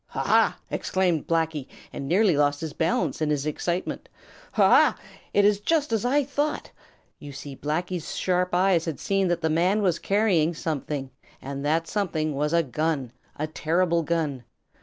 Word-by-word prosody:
"Ha, - - -6
ha!" - - +3
exclaimed 180 -4 0
Blacky, 160 -4 0 0.3
and 140 - -5
nearly 185 +1 +3
lost 145 0 +1
his 160 -2 -4
balance 165 -1 0
in 155 - +1
his 145 -1 0
excitement. 175 +4 -3 0.4
"Ha, - - +5
ha! - - +5 0.3
It 205 - +3
is 205 -1 +3
just 295 +3 0
as 225 0 0
I 285 +4 +3
thought!" 290 +2 -2 0.5
You 145 - -9
see 140 0 -8
Blacky's 170 +4 -3
sharp 180 -1 0
eyes 180 -2 +3
had 160 -4 -4
seen 195 -1 +1
that 175 -1 0
the 160 - +1
man 185 +6 +2
was 180 -4 +1
carrying 190 -6 +2
something, 145 -3 -4 0.3
and 140 +1 -6
that 160 +3 +1
something 160 -7 -1
was 150 +2 -1
a 170 0 +3
gun, 140 -1 -2 0.2
a 150 - -2
terrible 170 +2 +1
gun. 155 -5 -2
165 Hz, 170 wpm, -25 LUFS, 150-185 Hz, 0.5 s, Ha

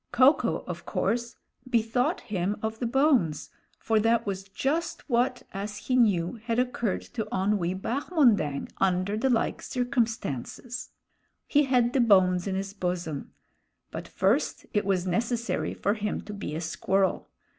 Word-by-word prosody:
Ko 255 +4 +7
ko, - - -2
of - - -6
course, 235 0 -1 0.3
bethought 235 +1 +1
him 195 0 -2
of 220 0 -2
the 240 - -1
bones, 245 - +2 0.3
for 220 -1 +1
that 230 +1 +2
was 195 -1 -3
just 295 - -2
what, 250 -1 +1
as 205 +1 -4
he 255 +5 -1
knew, 205 -4 +2
had 230 -1 -1
occurred 245 -5 0
to 220 -3 -4
Onwee 190 -1 0
Bahmondang 235 - +1
under 185 +1 +1
the 255 +5 +1
like 235 -3 +1
circumstances. 240 - -2 0.6
He 290 0 +3
had 250 -2 +2
the 265 - +3
bones 185 -5 +4
in 190 - -1
his 195 +1 -3
bosom; 175 -6 -3 0.6
but - - -6
first - - 0
it 205 - +1
was 190 -2 +1
necessary 235 +6 -1
for 200 - +1
him 210 -1 -2
to 210 - -8
be 195 -7 -5
a 160 - -3
squirrel. 190 +4 0
220 Hz, 150 wpm, -27 LUFS, 190-245 Hz, 0.6 s, Ko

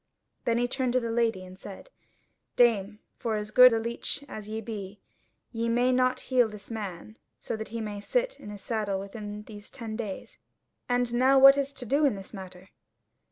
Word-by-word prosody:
Then 230 0 +2
he 245 +1 +1
turned 255 0 -1
to 255 - +4
the 230 -2 -3
Lady 225 -5 0
and 185 +1 -13
said: 205 - -10 0.6
"Dame, 210 -4 +3 0.2
for 225 -2 -1
as 210 0 -4
good 250 +3 +9
a 225 - +2
leech 235 +5 -3
as 215 -4 -8
ye 220 +1 -3
be, 205 -3 -7 0.5
ye 230 0 -1
may 245 +2 +3
not 255 0 +2
heal 245 -2 +5
this 210 +1 -11
man 215 0 -6 0.2
so - - -4
that 220 0 -6
he 230 +1 -4
may 205 -2 -5
sit - - -1
in - - -9
his 205 -1 -8
saddle 210 -4 -2
within 210 +1 -7
these 210 -1 -11
ten 225 -2 -6
days; 215 -4 -6 0.5
and 245 -1 +1
now 260 +3 +4
what 275 +1 +9
is 280 0 -1
to 255 - -7
do 280 +6 +2
in 275 -7 +3
this 195 +2 -10
matter?" 190 -1 -10
225 Hz, 200 wpm, -28 LUFS, 205-245 Hz, 0.6 s, good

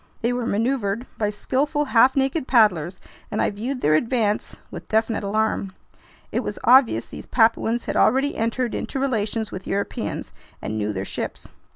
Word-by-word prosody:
They 240 +2 +2
were 245 -1 -2
maneuvered 230 0 0
by 210 -2 +1
skillful, 285 +8 -1
half 255 0 +4
naked 270 +1 0
paddlers, 185 - +3 0.3
and - - -3
I - - +2
viewed 245 +6 -4
their 155 - +3
advance 215 +3 0 0.2
with - - -8
definite 220 0 0
alarm. 200 -1 -1 0.6
It - - 0
was - - -4
obvious 245 - +5
these - - -10
Papuans 230 0 +2
had - - -3
already 270 +3 +3
entered 230 +2 -1
into 270 - -3
relations 220 -4 -1
with 185 0 -7
Europeans 200 +1 -3 0.3
and 110 - -4
knew 105 -1 -1
their 95 -1 -4
ships. - - -6
225 Hz, 165 wpm, -23 LUFS, 200-255 Hz, 0.6 s, obvious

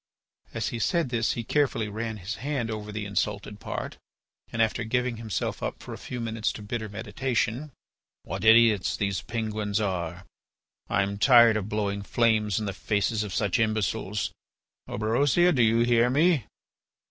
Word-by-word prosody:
As 110 -1 -1
he 120 - -4
said 165 +4 +1
this 115 -2 0
he 115 - -4
carefully 130 -4 +1
ran 110 +1 -4
his 105 +4 -5
hand 130 -5 -2
over 105 -1 -5
the 105 0 -4
insulted 100 +1 -2
part, - - -5 0.5
and, 115 - -5
after 115 +1 +2
giving 125 +1 -1
himself 110 -2 -3
up - - -3
for - - -9
a - - -7
few 125 - -6
moments 110 -1 -1
to 105 - -9
bitter 110 +1 -4
meditation: 120 +5 -2 0.5
"What - - -5
idiots 110 -3 +5
those 100 -3 -1
Penguins 110 -2 -2
are! 90 -3 -3 0.6
I 100 - +2
am 100 +1 -4
tired 120 -2 +7
of 105 -1 -2
blowing 100 -1 -1
flames 110 -1 +1
in 110 - -3
the 100 - -3
faces 105 +2 0
of 105 -2 -4
such 100 0 0
imbeciles. 110 -1 -1 0.6
Orberosia, 140 +11 +2
do 130 - +2
you 115 0 +4
hear 120 0 +4
me?" 150 - +3
110 Hz, 165 wpm, -27 LUFS, 105-120 Hz, 0.6 s, tired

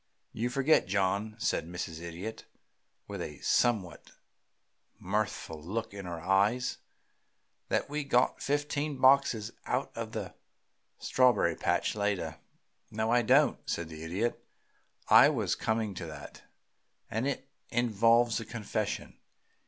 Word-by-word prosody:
"You 120 +2 -1
forget, 135 0 +3
John," 100 +2 0
said 95 - -1
Mrs. 85 -2 -5
Idiot, 85 +6 -7 0.6
with - - -5
a - - -6
somewhat 105 -8 +1 0.9
mirthful 95 -5 -3
look 105 +7 -4
in 100 -2 -7
her 85 -1 -5
eyes, 100 +8 +1 0.9
"that - - +1
we 150 +1 -3
got 125 -3 +2
fifteen 145 0 -1
boxes 130 -4 +4 0.2
out 130 +3 -1
of 115 -1 -5
the 100 -5 -5 0.6
strawberry 125 -9 +3
patch - - 0
later." 100 -6 -2 0.5
"No, 110 +1 -1
I 120 0 +5
don't," 115 - +4
said 85 -1 -2
the 80 -1 -9
Idiot. 95 +9 -2 0.6
"I - - +8
was - - 0
coming 110 -2 -1
to 85 -2 -6
that, 75 -2 -10 0.7
and 115 +5 -1
it 140 - -3 0.2
involves 115 0 +3
a 115 - -6
confession. 110 -1 -4
110 Hz, 125 wpm, -30 LUFS, 95-120 Hz, 0.9 s, I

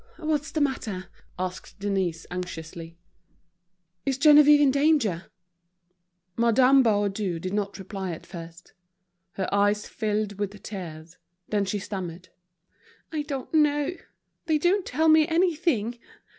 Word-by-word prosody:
"What's 310 -2 -1
the 310 - -2
matter?" 215 -10 -2 0.3
asked 185 0 -5
Denise, 190 -5 -1
anxiously. 165 -2 -7 1.1
"Is 270 +3 -1
Geneviève 295 0 +7
in 285 -2 +5
danger?" 280 - +2 1.1
Madame 250 +4 +5
Baudu 205 -5 0
did 185 +3 -5
not 205 -1 -2
reply 190 -1 -5
at 165 - -8
first. 170 -1 -11 0.6
Her 190 -2 -2
eyes 205 +1 +2
filled 210 -2 -2
with 205 0 -3
tears. 165 -4 -8 0.3
Then 205 -2 +1
she 195 +2 -2
stammered: 185 -3 -6 0.8
"I 310 -2 -1
don't 280 -2 -6
know; 295 +1 +2 0.5
they 315 -2 +3
don't 360 +5 +1
tell 315 +5 +1
me 315 -1 +6
anything. 320 - +1
210 Hz, 120 wpm, -26 LUFS, 185-290 Hz, 1.1 s, Geneviève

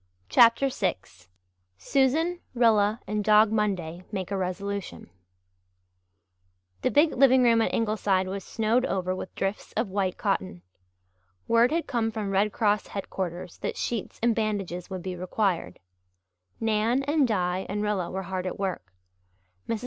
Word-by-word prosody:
CHAPTER 235 - +5
VI 210 -7 0 0.8
SUSAN, 280 - +1 0.2
RILLA, 220 -2 +3
AND 210 0 -2
DOG 215 +1 +5
MONDAY 185 -6 -1
MAKE 190 -2 -4
A - - 0
RESOLUTION 190 - -4 1.7
The - - +2
big 300 +2 +3
living 260 0 +5
room 230 -1 +4
at - - +1
Ingleside 210 -4 +1
was 195 0 -4
snowed 225 +5 +1
over 185 -1 -1
with 185 - -8
drifts 195 +2 -3
of 220 -1 -1
white 190 -2 -1
cotton. 90 -1 -2 0.8
Word 230 +3 +4
had 330 +1 0
come 230 -3 0
from 215 -3 -4
Red 200 +2 +2
Cross 210 -1 +1
headquarters 180 -3 -5
that - - -4
sheets 230 -4 -3
and 235 -1 +4
bandages 200 -5 -3
would 185 -2 -6
be 185 -1 -4
required. 185 0 -1 0.8
Nan 225 +4 +1
and 290 -1 +2
Di 185 -3 -1
and 205 +1 -2
Rilla 205 -4 -1
were 190 +1 -4
hard 185 0 -4
at - - -4
work. 185 - -4 0.8
Mrs. 230 - -1
205 Hz, 145 wpm, -26 LUFS, 185-230 Hz, 1.7 s, CHAPTER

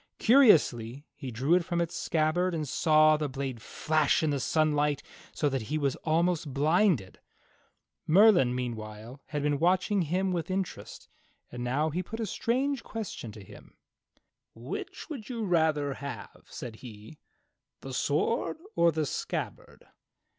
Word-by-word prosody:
Curiously 150 - +4
he 135 - -7
drew 130 +7 0
it 180 0 +4
from 175 0 -2
its 170 0 -2
scabbard, 165 +3 0
and 155 -2 -3
saw 155 +1 +4
the 150 -1 -2
blade 130 -3 -5
flash 155 +4 +1
in 155 - +1
the 140 - -1
sunlight 150 -1 +1 0.3
so 150 - -1
that 135 -2 -1
he 155 - 0
was 140 -3 0
almost 165 -1 0
blinded. 150 - +1 0.9
Merlin, 175 - +5
meanwhile, 115 +1 -6
had 145 -1 -3
been 145 -1 +1
watching 185 +4 +2
him 185 +4 0
with 175 0 -2
interest, 190 -1 -5 0.4
and 120 0 -6
now 145 +6 0
he 175 +4 -1
put 220 +5 -8
a 225 - -1
strange 260 +6 -1
question 205 - -6
to 105 -2 -11
him: - - -15 0.8
"Which 120 +9 -7
would 270 -9 -8
you 230 -3 -3
rather 160 -5 +1
have," 130 -7 -9
said 115 -3 -8
he, 110 +4 -12 0.6
"the 135 - -7
sword 150 - 0 0.2
or 170 0 +4
the 155 -1 -1
scabbard. - - -5
155 Hz, 145 wpm, -29 LUFS, 135-180 Hz, 0.9 s, Merlin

